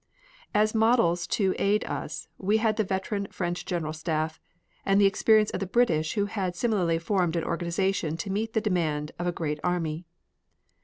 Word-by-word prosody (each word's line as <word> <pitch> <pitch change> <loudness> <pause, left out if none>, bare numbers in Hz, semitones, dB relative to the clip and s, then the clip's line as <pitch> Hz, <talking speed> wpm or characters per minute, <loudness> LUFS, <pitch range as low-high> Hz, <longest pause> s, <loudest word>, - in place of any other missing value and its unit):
As 215 +1 +3
models 220 -7 +3
to 190 -3 +1
aid 205 +2 +2
us - - -5
we 205 +3 +2
had 220 -1 +1
the 215 - +2
veteran 200 +1 -2
French 175 -2 -4
General 160 -4 -2
Staff 155 0 -2 0.4
and 195 0 +3
the 200 - +6
experience 215 +2 +4
of - - -3
the 195 - -3
British 175 -8 +2
who 205 -2 +1
had 195 -4 -3
similarly 180 -6 +1
formed 175 -1 0
an 165 - 0
organization 170 -1 -1
to 195 +3 -4
meet 220 +3 -2
the 220 - +1
demands 160 -7 -1
of 175 - -1
a - - +2
great 155 -3 -3
army. 170 -2 -1
185 Hz, 175 wpm, -27 LUFS, 165-210 Hz, 0.4 s, the